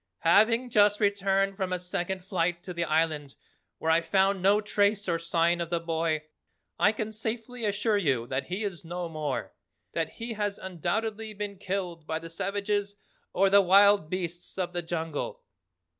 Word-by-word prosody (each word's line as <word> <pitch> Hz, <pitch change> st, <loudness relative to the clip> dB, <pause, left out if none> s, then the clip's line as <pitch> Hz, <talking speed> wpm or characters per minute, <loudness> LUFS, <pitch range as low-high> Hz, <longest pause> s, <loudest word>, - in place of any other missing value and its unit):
Having 230 Hz, +8 st, +4 dB
just 205 Hz, -1 st, +4 dB
returned 195 Hz, -1 st, +1 dB
from 190 Hz, -2 st, -2 dB
a 180 Hz, -, +1 dB
second 180 Hz, +1 st, -3 dB
flight 175 Hz, -2 st, -1 dB
to 180 Hz, -, -6 dB
the 170 Hz, 0 st, -1 dB
Island 155 Hz, -3 st, 0 dB, 0.4 s
where 160 Hz, -, 0 dB
I 165 Hz, +1 st, +4 dB
found 190 Hz, +3 st, +2 dB
no 200 Hz, +3 st, +5 dB
trace 205 Hz, -1 st, +1 dB
or 170 Hz, -2 st, +1 dB
sign 170 Hz, +1 st, +1 dB
of 170 Hz, -, -3 dB
the 170 Hz, -1 st, 0 dB
boy, 165 Hz, -2 st, -1 dB, 0.6 s
I 205 Hz, -, +5 dB
can 220 Hz, 0 st, -4 dB
safely 225 Hz, +2 st, -4 dB
assure 205 Hz, +1 st, +1 dB
you 135 Hz, -10 st, +1 dB
that 130 Hz, +2 st, -2 dB
he 185 Hz, +5 st, -3 dB
is 190 Hz, -5 st, -4 dB
no 175 Hz, +1 st, -4 dB
more, 145 Hz, -10 st, -3 dB, 0.4 s
that 165 Hz, -2 st, -2 dB
he 230 Hz, 0 st, -5 dB
has 205 Hz, -2 st, -2 dB
undoubtedly 210 Hz, +5 st, -3 dB
been 200 Hz, -1 st, -5 dB
killed 180 Hz, -5 st, -4 dB
by 160 Hz, -, -1 dB
the 165 Hz, 0 st, -8 dB
savages 205 Hz, +3 st, -1 dB, 0.4 s
or 195 Hz, +1 st, +3 dB
the 200 Hz, 0 st, +8 dB
wild 200 Hz, -2 st, +5 dB
beasts 175 Hz, -1 st, -4 dB
of 180 Hz, -1 st, -2 dB
the 175 Hz, -, -1 dB
jungle." 165 Hz, -3 st, -4 dB
185 Hz, 175 wpm, -28 LUFS, 165-205 Hz, 0.6 s, the